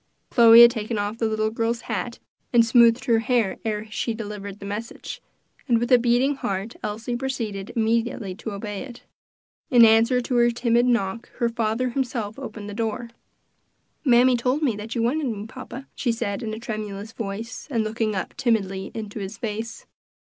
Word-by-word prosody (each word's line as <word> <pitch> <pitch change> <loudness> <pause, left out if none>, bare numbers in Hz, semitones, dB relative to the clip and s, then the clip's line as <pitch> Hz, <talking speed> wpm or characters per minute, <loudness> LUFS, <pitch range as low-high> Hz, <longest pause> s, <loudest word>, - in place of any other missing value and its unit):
Chloe 235 -1 +9
had 235 - +8
taken 220 -1 -3
off 205 +2 -3
the 225 - +1
little 215 0 0
girl's 230 +1 -1
hat 240 +1 -4 0.3
and 235 -2 +5
smoothed 235 +1 +5
her 230 -2 +3
hair 230 -4 0
ere 215 -1 -2
she 230 +1 -2
delivered 205 -2 -6
the 200 - -8
message, 210 +3 -6 0.5
and 240 -3 +4
with 240 +2 -2
a 250 - +7
beating 245 +4 +2
heart 200 0 -3
Elsie 225 +3 -3
proceeded 230 -7 -4
immediately 225 -3 0
to 220 +3 -7
obey 205 0 -5
it. 255 -3 -10 0.7
In 240 -2 +8
answer 225 +3 +5
to 250 +1 -2
her 240 0 +5
timid 240 0 +2
knock, 230 -2 0
her 235 - 0
father 230 +2 -1
himself 240 -4 -3
opened 220 -6 -7
the 205 - -6
door. 230 +2 -3 0.9
"Mammy 250 -1 +5
told 255 +5 0
me 250 -7 +2
that 215 +3 -6
you 230 - 0
wanted 280 +5 0
me, 215 -3 -4
papa," 265 +4 -9
she 245 - -1
said 225 -3 -3
in 220 - -4
a - - -8
tremulous 215 -2 -5
voice, 225 +1 -6
and 230 -5 0
looking 215 -1 -1
up 190 - -3
timidly 195 -6 0
into 215 -1 -5
his 195 +1 -6
face. 225 +1 -5
230 Hz, 180 wpm, -24 LUFS, 210-240 Hz, 0.9 s, Chloe